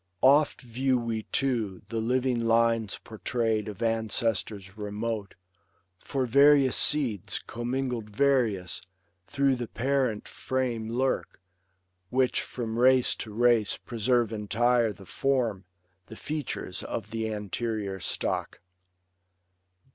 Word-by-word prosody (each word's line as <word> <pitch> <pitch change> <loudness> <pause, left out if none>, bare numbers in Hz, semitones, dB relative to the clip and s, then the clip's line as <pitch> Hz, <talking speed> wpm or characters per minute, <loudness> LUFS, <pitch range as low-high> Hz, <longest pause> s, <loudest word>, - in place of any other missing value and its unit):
Oft 140 +3 +5
view 130 +1 0
we, 115 -2 -2
too, 115 -9 -1
the 115 - -2
living 125 +1 +1
lines 115 -2 +2
portray'd 110 -1 -1
Of 105 +2 -5
ancestors 110 -3 -1
remote; 105 0 -4 0.6
for 135 -2 -2
various 140 +1 +5
seeds, 125 - +1
Commingled 120 -2 -3
various, 110 -7 +1 0.5
through 140 +1 +2
the 120 -1 -4
parent 130 -4 0
frame 120 -4 -2
Lurk, 130 -4 -1 0.7
which 130 +2 +2
from 115 -2 -4
race 130 0 +5
to 110 - -6
race 115 -1 +3
preserve 120 0 0
entire 115 +2 +2
The 95 -1 -12
form, 120 -6 0 0.4
the 110 - -10
features 150 -11 -4
of 110 -1 -5
the 110 -1 -2
anterior 105 -1 -3
stock. - - -2
115 Hz, 110 wpm, -28 LUFS, 110-130 Hz, 0.7 s, Oft